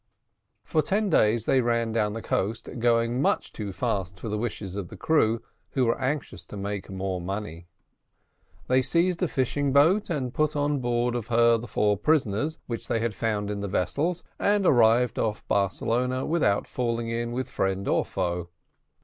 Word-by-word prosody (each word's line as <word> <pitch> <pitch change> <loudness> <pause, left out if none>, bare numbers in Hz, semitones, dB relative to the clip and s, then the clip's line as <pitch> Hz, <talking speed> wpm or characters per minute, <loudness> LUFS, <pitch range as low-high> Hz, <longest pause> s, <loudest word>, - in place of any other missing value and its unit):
For 155 - +1
ten 200 +5 0
days 110 -5 +3
they 130 - +3
ran 115 -1 0
down 105 -2 0
the 115 - -6
coast, 110 +4 -1
going 115 +1 +2
much - - 0
too 105 -2 -5
fast 95 -4 -2
for 110 - -5
the 105 - -1
wishes 105 -4 -4
of 100 -3 -4
the - - -11
crew, 115 -8 +2 0.3
who 130 -2 +2
were 115 +3 0
anxious 130 - -2
to 105 - -8
make 100 0 -4
more 95 -1 -3
money. 90 -3 -5 1.0
They 130 +1 +4
seized 170 +5 +1
a 180 - +2
fishing 140 +1 0
boat 165 +10 +4
and 135 -7 -2
put 155 0 +1
on 145 0 +1
board 120 -1 0
of 120 -3 -3
her 115 0 +4
the 120 - -7
four 105 -3 +1
prisoners, 145 - +1
whom 115 -2 -3
they 115 - +1
had 115 -1 -1
found 105 -1 -1
in 105 - -3
the 100 - -3
vessels, 150 - -1 0.2
and 205 -1 +2
arrived 120 -3 +4
off 105 -2 -2
Barcelona, 120 +6 0
without 145 -12 +1
falling 115 -2 -2
in 115 0 -2
with 130 +1 -2
friend 95 0 -1
or - - +2
foe. 90 -2 -3
115 Hz, 180 wpm, -26 LUFS, 105-130 Hz, 1.0 s, They